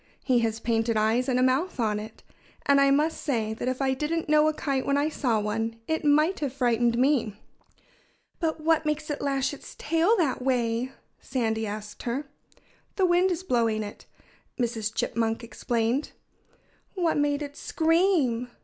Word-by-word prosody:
He 255 -3 +3
has 225 -1 -1
painted 225 0 0
eyes 225 +5 +2
and 250 -1 +2
a - - +3
mouth 265 +6 +1
on 215 -2 +1
it. 215 +1 -10 0.4
And 280 0 +5
I 275 - +5
must 300 +4 +1
say 225 -6 -1
that 225 - -5
if 255 +1 -1
I 265 -1 +2
didn't 310 +5 -2
know 305 0 +4
a - - +3
kite 275 -4 -1
when 280 0 +1
I 290 +2 +1
saw 245 -8 0
one 225 +2 -2
it 320 0 -1
might 305 +5 +3
have 285 -4 -2
frightened 240 -3 +1
me." 250 -5 +2 1.0
"But 320 -2 -1
what 320 0 +2
makes 300 0 -2
it 290 - -4
lash 275 0 0
its 285 - -11
tail 330 +8 +2
that 295 -9 0
way?" 245 -1 0 0.3
Sandy 220 -3 -1
asked 210 0 -7
her. 255 +5 -3 0.7
"The 380 - +3
wind 355 +1 +3
is 360 0 -2
blowing 230 -8 +1
it," 205 - -10 0.5
Mrs. 225 -3 -1
Chipmunk 225 +1 -1
explained. 235 +3 -1 0.8
"What 345 -5 +1
made 290 0 +1
it 285 0 -8
scream?" 320 -9 +1
260 Hz, 170 wpm, -26 LUFS, 230-300 Hz, 1.0 s, And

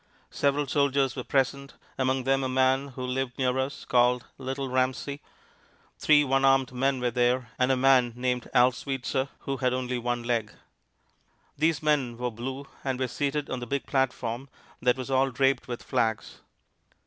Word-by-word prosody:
Several 140 +1 +1
soldiers 140 -2 +1
were 125 - -4
present, 140 +1 -1 0.2
among 130 0 0
them 135 +1 +1
a 130 - -1
man 130 +1 +2
who 130 -1 -6
lived 125 0 -2
near 130 0 +1
us, 130 +1 -3
called 125 0 +3
"Little 135 +1 -3
Ramsey." 130 +2 -1 0.8
Three 150 -1 +5
one 135 -1 +1
armed 135 -1 +4
men 130 +1 0
were 125 -1 0
there, 125 0 +1
and 130 +1 +3
a 130 - +2
man 125 -2 +4
named 125 0 -2
Al 125 +1 +5
Sweetser, 135 +1 -3
who 135 0 -3
had 125 0 +1
only 125 -1 -2
one 120 0 -2
leg. 115 -3 -1 1.0
These 155 0 +1
men 140 -6 +1
wore 125 0 -2
blue, 130 +5 -6 0.2
and 130 -2 -1
were 130 - 0
seated 145 +3 -2
on 130 - -2
the 120 - -6
big 140 +2 -2
platform 130 -1 -1 0.3
that 125 +1 +3
was 130 +1 -5
all 135 +1 +3
draped 135 0 +1
with 120 -1 -5
flags. 115 -4 -1
130 Hz, 170 wpm, -27 LUFS, 125-135 Hz, 1.0 s, Three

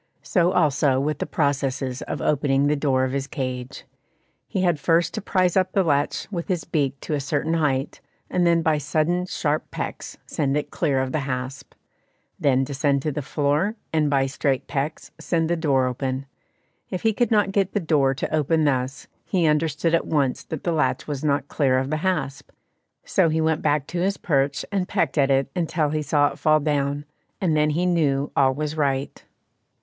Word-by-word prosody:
So 175 -2 +2
also 145 -4 +3
with 150 +1 -1
the - - -2
processes 135 -3 -1
of 145 - -4
opening 140 -1 +2
the 145 +1 +2
door 135 -3 +1
of 130 - 0
his 135 0 -2
cage. 130 -2 -5 0.6
He 190 - -1
had 175 -4 +2
first 165 +3 +2
to - - -3
prize 185 -3 +1
up 185 -1 +2
the 195 - +3
latch 145 -3 0
with 170 -4 -4
his 180 -4 -1
beak 140 -3 -1
to - - -4
a 145 - +1
certain 145 +3 -1
height, 145 -4 0 0.3
and 180 - 0
then 170 -1 +3
by 155 -2 +2
sudden 170 +5 0
sharp 150 -4 -1
pecks - - -6
send 140 -1 -1
it 150 - -3
clear 140 -6 +1
of 130 0 -2
the 155 - 0
hasp; 130 +2 -5 0.6
then 135 -2 +3
descend 140 0 0
to 155 - 0
the 150 - -3
floor, 150 +8 0 0.2
and 155 -2 +2
by 135 -2 +2
straight 135 0 -1
pecks 140 +2 -3
send 165 -1 0
the - - +3
door 140 -6 +2
open. 130 +1 -2 0.6
If 185 - -4
he 225 -1 +3
could 240 +1 +1
not 210 -3 +3
get 195 -1 0
the 205 - +1
door 145 -6 +2
to 145 - -2
open 155 +1 +2
thus, 135 -1 -1 0.2
he 180 -4 +1
understood 155 +1 +1
at 165 - +2
once 140 -5 0
that 160 - -6
the 175 - 0
latch 160 -2 0
was 145 -2 -4
not 145 -2 +1
clear 135 -4 +2
of 130 +2 -1
the 155 - +1
hasp, 170 -5 -2 0.6
so 165 - +2
he 160 +1 0
went 160 -1 +1
back 150 -2 +1
to 170 +3 -4
his 195 +3 0
perch 140 -4 0
and 190 -3 0
pecked 150 -1 0
at 135 -1 +3
it 135 0 +2
until 160 -3 0
he 155 +1 -1
saw 145 0 +2
it - - -11
fall 155 -1 +4
down, 145 -1 -1 0.3
and 170 -5 +1
then 150 0 +3
he 165 +4 0
knew 145 -6 +1
all 130 -1 +3
was 150 +1 -3
right. 140 -3 -1
150 Hz, 200 wpm, -23 LUFS, 135-165 Hz, 0.6 s, fall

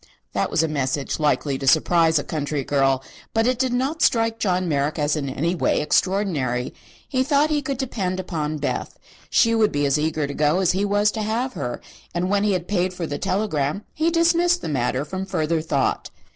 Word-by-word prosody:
That - - 0
was - - +2
a - - +1
message 140 -1 -2
likely 145 -2 +1
to 135 - -4
surprise 165 +2 +4
a 145 - 0
country 145 -2 -3
girl, 135 -1 +1 0.3
but 225 0 +3
it 250 0 +1
did 260 -1 +1
not 270 +6 -1
strike 225 -1 +2
John 185 -2 0
Merrick 145 0 0
as 150 0 +1
in 140 -3 -3
any 165 +6 -1
way 180 - +1
extraordinary. 150 -8 0 0.3
He 255 - 0
thought 285 +3 +2
he 295 -1 +1
could 275 -1 -3
depend 195 -8 -2
upon 155 -4 -3
Beth. 145 - -3 0.3
She 230 -1 +4
would 220 -2 +3
be 145 0 0
as 140 +1 +2
eager 155 -1 0
to 140 - -5
go 150 +3 +2
as 185 -2 +3
he 195 +2 0
was 205 +1 +2
to 220 - -4
have 235 +5 -1
her, 120 - -4 0.3
and 180 +2 0
when 205 0 +2
he 210 -1 +2
had 180 -1 -2
paid 185 -2 0
for 175 - -3
the 145 -2 -4
telegram 190 -3 -1
he 315 +2 +1
dismissed 340 +1 +2
the - - -3
matter 130 0 -1
from 190 +4 -4
further 160 -4 -1
thought. 145 -4 -1
175 Hz, 210 wpm, -23 LUFS, 145-220 Hz, 0.3 s, surprise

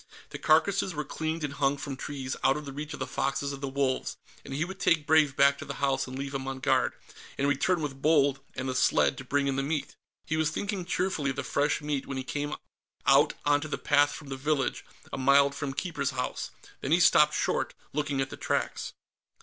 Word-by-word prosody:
The - - -6
carcasses 180 +3 +3
were 150 - -2
cleaned 160 0 -3
and 145 -1 -2
hung 140 0 +1
from 140 -1 -5
trees, 130 -1 -5
out 135 - +4
of 150 -1 -7
reach 150 +1 -5
of - - -12
the 130 - -1
foxes 140 +1 -1
and 135 - -8
the 140 - -2
wolves, 135 -1 -1 0.3
and - - -10
he 145 +5 -1
would 190 +1 -8
take 160 -4 +3
Brave 155 -3 +4
back 140 0 +4
to - - -6
the - - -5
house 135 -1 0
and 130 +1 -6
leave 140 0 -4
him 135 -1 -3
on 135 0 -3
guard, - - +2 0.4
and 140 - +1
return 160 +5 +2
with 135 -2 -5
Bold 145 -3 +4 0.2
and 130 +1 -3
the 130 - -1
sled 125 +1 +3
to - - -6
bring 140 +2 0
in 135 -1 0
the - - +2
meat. 145 +1 -2 0.3
He 160 - -1
was 160 -1 +2
thinking 200 -3 -3
cheerfully 180 -5 0
of 135 - -2
the 140 - -3
fresh 145 +4 0
meat 150 -2 -2
when 135 - -4
he 130 - -3
came 145 +2 -3 0.5
out - - +5
onto 145 +1 +2
the 150 - -3
path 145 0 +3
from 145 -1 -9
the 135 - -4
village, 140 -1 0 0.3
a - - -3
mile 140 +1 +5
from 140 0 -4
Keeper's 140 0 -2
House. 125 -2 -3 0.3
Then - - -4
he - - +5
stopped - - +6
short, - - 0 0.2
looking 145 -2 0
at 135 - -3
the - - -7
tracks. - - -2
140 Hz, 230 wpm, -28 LUFS, 135-150 Hz, 0.5 s, stopped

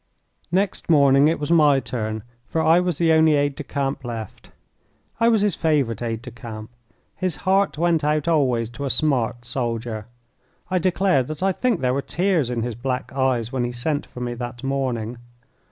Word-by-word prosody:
Next 190 0 0
morning 140 -2 +5
it 160 - +1
was 150 +2 -3
my 150 -5 +5
turn, 110 -4 -4 0.2
for 160 - -2
I 165 +2 +5
was 180 -4 -1
the 165 -1 +3
only 160 -1 +5
aide 145 0 +1
de 150 - -6
camp 135 0 -3
left. 115 -4 -7 0.7
I 230 - +4
was 225 -3 +4
his 205 -2 +2
favourite 140 -10 0
aide 115 -1 -3
de 125 - -8
camp. 115 -2 -9 0.4
His 185 -3 -1
heart 195 -2 +2
went 165 -1 +2
out 150 +1 +1
always 125 -8 +1
to 140 +4 -5
a - - -1
smart 125 -3 0
soldier. 115 -3 -3 0.6
I 185 - +2
declare 185 -4 +2
that 155 +6 -5
I 195 - +3
think 230 0 0
there 125 -1 +1
were 140 - 0
tears 170 -4 0
in 120 -2 -2
his 120 0 -3
black 125 +3 -3
eyes 130 -3 0
when 130 -2 -1
he 120 - -2
sent 145 +5 -2
for 125 - -10
me 120 0 -2
that 120 +1 -7
morning. 125 -4 -2
135 Hz, 190 wpm, -22 LUFS, 120-160 Hz, 0.7 s, morning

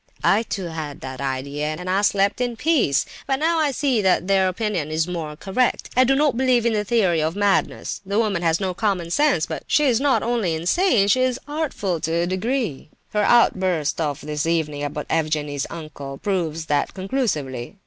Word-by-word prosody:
"I 210 - +4
too 205 -4 -4
had 155 -4 -6
that 130 0 -7
idea, 140 +3 -2
and 180 - -8
I 190 +2 +2
slept 200 +2 +2
in 245 -1 -1
peace. 250 - +2 0.2
But 270 - +2
now 325 +4 +1
I 305 -2 +2
see 265 -4 +1
that 185 -2 +2
their 195 -1 +3
opinion 185 -5 -2
is 160 +1 0
more 165 -4 -4
correct. 200 +10 -1
I 255 - +6
do 270 +2 +3
not 290 -2 +2
believe 250 -2 +2
in 235 - +2
the 210 -1 0
theory 190 -7 +2
of 160 +3 -1
madness! 205 -1 0
The 200 +1 -2
woman 210 -6 +1
has 165 -1 +1
no 190 -2 -1
common 180 -4 -1
sense; 280 - +2
but - - -5
she 300 - +3
is 255 -4 +2
not 265 -6 +2
only 230 -7 0
not 160 - -4
insane, 220 - +3
she 255 +6 +3
is 255 0 +1
artful 290 - -2
to 160 +1 -2
a 170 +1 +1
degree. 190 - -2 0.2
Her 210 - +2
outburst 185 -9 +2
of 145 -3 -2
this 150 +1 -3
evening 150 -3 -1
about 145 +1 -4
Evgenie's 150 -3 -1
uncle 145 -4 -8
proves 165 -5 -2
that 145 -2 0
conclusively. 185 - -3
185 Hz, 200 wpm, -22 LUFS, 155-235 Hz, 0.2 s, I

